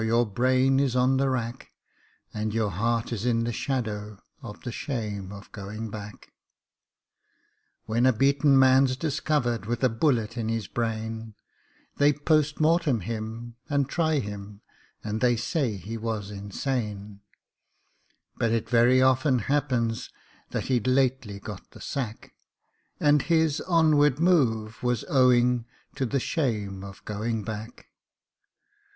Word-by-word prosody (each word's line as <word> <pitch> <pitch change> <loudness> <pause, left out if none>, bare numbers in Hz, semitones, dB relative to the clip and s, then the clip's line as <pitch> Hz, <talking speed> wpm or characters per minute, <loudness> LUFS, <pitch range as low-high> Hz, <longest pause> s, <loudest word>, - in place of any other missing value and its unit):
your 115 +2 +2
brain 130 +5 +2
is 135 -3 +1
on 130 +1 +3
the 135 0 +2
rack, 120 -1 -4 0.6
And 105 0 -3
your 110 -3 +1
heart 115 +6 -1
is 110 -2 -4
in 115 -1 +1
the 120 - -1
shadow 105 -6 -3 0.2
of 105 -2 -9
the 120 - -5
shame 105 -7 -4
of 100 0 -11
going 105 +2 -6
back. 105 -1 -9 1.5
When 115 +3 +2
a - - +6
beaten 140 +3 +3
man's 130 0 +5
discovered 135 -7 -1
with 120 +1 -2
a 130 - +5
bullet 115 -2 0
in 110 -1 -2
his 115 -4 -2
brain, 110 -1 -4 0.6
They 145 +1 +5
POST 150 0 +1
MORTEM 155 -6 +2
him, 115 +3 -6
and 140 -2 +1
try 160 0 +1
him, 105 -3 -6 0.4
and 110 +1 -3
they 125 -1 +4
say 125 +1 -1
he 110 +5 -6
was 110 -3 -4
insane; 105 -1 -4 1.2
But 115 - +1
it 115 -1 0
very 125 +2 +4
often 130 +1 +3
happens 125 -3 0 0.4
that - - -2
he'd 125 -3 0
lately 130 -5 +1
got - - -9
the - - -15
sack, 120 -5 -5 0.7
And 145 -1 +4
his 160 -1 +2
onward 150 -5 +4
move 115 -11 +2
was 125 -2 0
owing 125 -2 +3 0.3
to 130 - -2
the 135 +4 0
shame 105 - -2
of 100 -1 -11
going 110 +1 -2
back. 110 +2 -7
120 Hz, 135 wpm, -26 LUFS, 110-135 Hz, 1.5 s, a